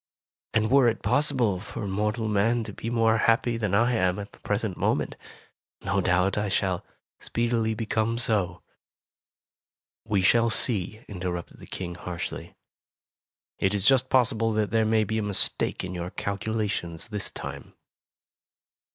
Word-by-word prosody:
And 110 +1 +2
were 135 -2 +6
it 115 - 0
possible 120 -4 +1
for 110 +2 -6
mortal 105 +3 -1
man 110 +3 +2
to - - -7
be 115 - -5
more 115 -1 +3
happy 115 +2 +2
than 105 -4 0
I 120 +4 +3
am 95 -4 +1
at 100 -1 -7
the - - -19
present - - -2
moment, - - 0 0.7
no 95 +2 +1
doubt 95 +3 +2
I 105 -1 -1
shall 95 -2 0 0.4
speedily 115 -1 0
become 110 +1 -1
so." 100 -7 +1 1.4
"We 105 -4 0
shall 115 +4 +4
see," 110 -1 0
interrupted 90 -3 -5
the - - -12
King, 90 -2 -5
harshly; 85 -1 -6 1.0
"it 95 +2 +1
is 100 -1 +1
just 130 0 +4
possible 115 -3 +2
that 105 -1 0
there 110 0 +3
may 110 0 +3
be 110 +2 -1
a - - 0
mistake 105 -2 +1
in 90 0 -5
your 90 0 -4
calculations 100 -4 -3
this 105 -3 -1
time." - - -8
110 Hz, 150 wpm, -26 LUFS, 95-115 Hz, 1.4 s, were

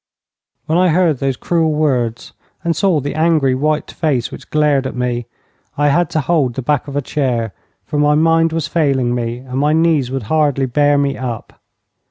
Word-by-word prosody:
When 160 +3 +1
I 185 - +4
heard 165 -4 +2
those 135 -2 -1
cruel 165 -2 0
words 125 -7 -1 0.3
and 170 -1 0
saw 180 -2 +2
the 145 +1 -4
angry, 155 -4 +2
white 150 +4 -1
face 140 -7 -1
which - - -11
glared 150 -3 +2
at - - -7
me, 120 -1 -2 0.5
I 145 0 +3
had 170 +2 +2
to 155 - 0
hold 135 -4 0
the 130 - -4
back 145 +3 0
of 140 - -7
a 145 - -1
chair, 120 -7 -1 0.3
for 150 - -2
my 150 0 +3
mind 165 +1 +3
was 165 -1 -2
failing 135 -7 +1
me 120 -1 -2
and 130 +1 -5
my 150 +2 +2
knees 160 -5 +2
would 135 -2 -3
hardly 145 +1 +1
bear 145 +3 +2
me 140 -1 0
up. 120 -4 -6
145 Hz, 195 wpm, -17 LUFS, 130-155 Hz, 0.5 s, I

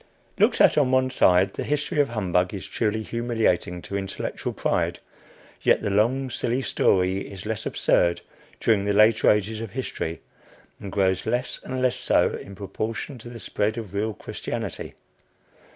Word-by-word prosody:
Looked - - +4
at - - +6
on 140 -3 +3
one 130 0 +2
side, 90 -3 +4
the - - -4
history 150 +2 -1
of 140 - 0
humbug 90 -4 0
is 95 - -6
truly 110 -1 -1
humiliating 110 -7 -1
to 100 - -6
intellectual 95 -1 -3
pride, - - 0 0.6
yet - - +3
the 100 - 0
long 125 +6 +1
silly 125 +3 -1
story 95 -4 +2
is 100 -1 -8
less 110 0 -3
absurd 85 0 +2 0.4
during 105 -3 +2
the 100 - +1
later 110 +2 +5
ages 105 +1 +1
of 110 -3 -7
history, 115 -10 -4 0.6
and 100 - -7
grows 95 -2 +1
less 125 +1 -1
and 130 0 -3
less 125 -1 +2
so - - +2
in 100 - -8
proportion 110 +7 -5
to 120 - -9
the 120 -1 -9
spread 105 +1 -1
of 105 -5 -6
real 105 +1 -1
Christianity. - - -5
110 Hz, 165 wpm, -25 LUFS, 95-120 Hz, 0.6 s, at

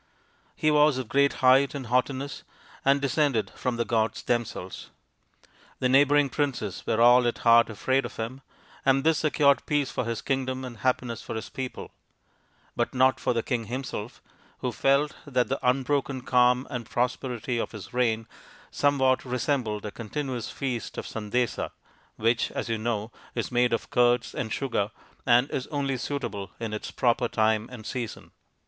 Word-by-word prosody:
He 155 - +2
was 150 -2 +4
of 130 -3 -4
great 140 +4 +3
height 135 +2 +5
and 135 -2 -5
haughtiness, 130 +4 -1 0.4
and 140 +1 +4
descended 140 -4 +1
from 125 -1 -2
the 120 0 -1
gods 110 -1 0
them 120 -1 +1
selves. 95 -4 -8 0.9
The 130 - +1
neighbouring 145 +2 +5
princes 135 -8 -2
were 110 - +1
all 120 +1 +6
at 120 - -1
heart 115 0 +6
afraid 130 +5 0
of 120 - -7
him, 120 +4 -5 0.4
and 135 0 +3
this 160 0 +3
secured 145 -2 +3
peace 145 -3 +1
for - - -2
his 115 0 -3
kingdom 130 -1 -1
and 120 -3 -8
happiness 125 -1 -1
for - - -6
his 110 - -5
people; 130 -2 -6 0.8
but - - -1
not 130 +1 +4
for - - 0
the 115 -1 -1
king 120 -4 -2
himself, 120 -2 -5 0.4
who 125 - -1
felt 140 +4 +2
that 125 -3 +1
the 135 - -1
unbroken 135 +1 0
calm 125 +1 +3
and 120 -3 -5
prosperity 125 -1 -1
of - - -3
his 100 -2 -10
reign 115 -3 +1 0.5
somewhat 135 -2 +2
resembled 125 -4 -1
a 105 - -4
continuous 125 +2 -4
feast 125 -4 -4
of - - -4
sandesa, 110 +2 -2 0.5
which, 115 +2 +1
as - - -3
you 115 -1 -1
know, 110 -1 -2 0.2
is - - -2
made 125 0 +3
of 115 - -2
curds 120 0 +3
and 110 -3 -3
sugar, 120 -7 -1 0.4
and 125 +2 +5
is 130 - -3
only 140 -3 -1
suitable 115 -7 -4
in 115 -2 -4
its 105 - -4
proper 120 0 +1
time 110 0 +1
and 115 -4 -9
season. 120 -2 -5
125 Hz, 165 wpm, -27 LUFS, 115-135 Hz, 0.9 s, all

